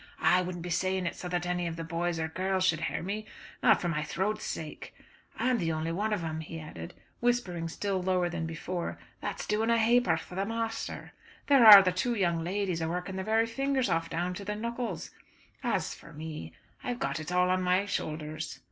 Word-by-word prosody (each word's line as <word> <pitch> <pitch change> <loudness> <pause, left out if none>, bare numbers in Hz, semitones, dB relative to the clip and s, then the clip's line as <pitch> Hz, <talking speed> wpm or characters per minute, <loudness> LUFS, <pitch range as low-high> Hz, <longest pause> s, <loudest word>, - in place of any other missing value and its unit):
"I 180 - +4
wouldn't 175 -1 -5
be 175 - -4
saying 185 +2 0
it 170 - -2
so 180 - -6
that 175 0 -1
any 175 0 -1
of 165 - -4
the 165 - -5
boys 170 0 -2
or 160 - 0
girls 185 +3 0
should 165 -4 +2
hear - - -2
me, 210 +4 -4 0.3
not - - +5
for 175 - -2
my 160 -3 0
throat's 190 +7 -2
sake. 155 -1 -6 0.4
I 230 - 0
am 245 - +2
the 165 -3 0
only 160 +1 -2
one 210 +6 -1
of 205 -5 0
'em," 160 -1 -3
he 160 +1 -6
added, 85 - -8 0.2
whispering 195 -9 0
still 195 +2 -2
lower 180 -1 +1
than 170 -2 -3
before, 170 +2 -4 0.2
"that's - - -4
doing 215 +2 +1
a 230 - +4
ha'porth 225 -7 +3
for - - -12
the 190 +2 -1
masther. 225 +1 -3 0.3
There 275 -4 +6
are 205 -2 +13
the 185 - +2
two 235 +7 0
young 170 -5 +1
ladies 185 -1 -1
a 160 - -1
working 180 +2 -3
their 190 0 -3
very 225 +1 +3
fingers 265 +1 0
off 165 -1 0
down 175 +2 -1
to 200 - -6
the 210 +1 -3
knuckles. 230 -5 -4 0.5
As - - 0
for - - -13
me, 150 - -7 0.3
I've 245 -1 -2
got 245 - -2
it 155 +2 -6
all 180 0 +3
on 185 0 +2
my 185 +2 +2
shoulders." 155 -4 -4
180 Hz, 220 wpm, -30 LUFS, 165-210 Hz, 0.5 s, are